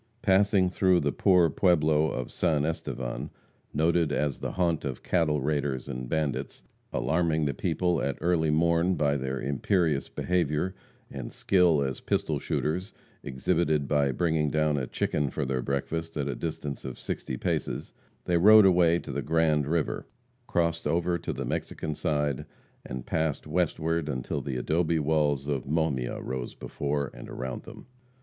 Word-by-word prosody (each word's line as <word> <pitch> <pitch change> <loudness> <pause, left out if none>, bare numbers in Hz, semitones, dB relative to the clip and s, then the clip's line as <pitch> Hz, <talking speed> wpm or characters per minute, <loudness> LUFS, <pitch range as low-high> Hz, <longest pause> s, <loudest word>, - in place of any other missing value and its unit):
Passing 95 0 +4
through 95 -1 +3
the 70 - +1
poor 90 -1 +4
pueblo 80 -3 +3
of 65 -3 -4
San 75 -2 +1
Estevan, 65 -6 -4 0.4
noted 80 0 +2
as 75 -1 -1
the - - -4
haunt 85 -4 +1
of 65 -3 -5
cattle 75 -5 +1
raiders 70 -3 -1
and 65 -2 -5
bandits; 75 -5 -2 0.3
alarming 80 -2 +1
the 70 - 0
people 90 +5 0
at 70 -1 -1
early 85 -2 +2
morn 85 +3 +3
by 70 -3 +1
their 65 -1 -2
imperious 70 +3 0
behavior 90 0 0 0.4
and 65 -3 -6
skill 90 -6 +3
as 65 -2 -3
pistol - - -1
shooters, 90 +7 -2 0.3
exhibited 75 +2 0
by 70 -2 +2
bringing 80 +2 +1
down 75 0 +1
a 65 -3 -2
chicken 75 +2 -1
for 70 - -2
their 65 -1 -1
breakfast 80 +5 -3
at 70 -1 -1
a 70 - -1
distance 75 -3 -5
of 65 -2 -6
sixty 65 - -4
paces, - - -2 0.3
they 85 - +2
rode 105 +4 +8
away 85 -2 +5
to 80 - -6
the - - -2
Grande 80 -2 +2
river, 80 0 -1 0.4
crossed 85 -1 0
over 85 +1 +1
to - - -4
the - - -4
Mexican 75 - -3
side, 75 -2 -1 0.4
and 65 0 -6
passed 80 -3 -1
westward 80 -1 0
until 65 -3 -2
the 65 -2 -3
adobe 80 +5 +1
walls 75 -2 +1
of 70 -4 -1
Mojmia 75 -5 0
rose 65 -1 -4
before 70 -1 -3
and - - -10
around 65 0 -5
them. - - -11
75 Hz, 155 wpm, -28 LUFS, 70-85 Hz, 0.4 s, rode